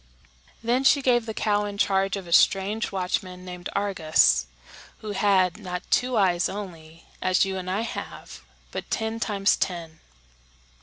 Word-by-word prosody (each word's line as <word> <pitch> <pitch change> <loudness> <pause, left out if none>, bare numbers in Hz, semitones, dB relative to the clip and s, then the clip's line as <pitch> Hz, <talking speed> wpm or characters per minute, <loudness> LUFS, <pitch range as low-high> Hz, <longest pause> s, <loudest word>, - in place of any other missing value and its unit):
Then 245 +3 +1
she 280 0 +4
gave 240 -3 +2
the 220 - -3
cow 205 -1 +1
in 205 -1 -6
charge 195 0 +1
of 195 - -7
a 170 - -4
strange 200 +5 +3
watchman 185 -1 -3
named 180 0 -7
Argus, 160 - +2 0.5
who 215 - -5
had, 190 -2 +2
not 180 -3 -5
two 250 -1 +2
eyes 180 -3 +2
only, 165 -5 -9 0.2
as 185 +1 +3
you 190 0 -3
and 185 -1 -5
I 195 +4 0
have, 230 - -7 0.3
but - - -6
ten 220 0 -2
times 205 -3 +2
ten. 165 -3 -4
195 Hz, 155 wpm, -25 LUFS, 180-210 Hz, 0.5 s, she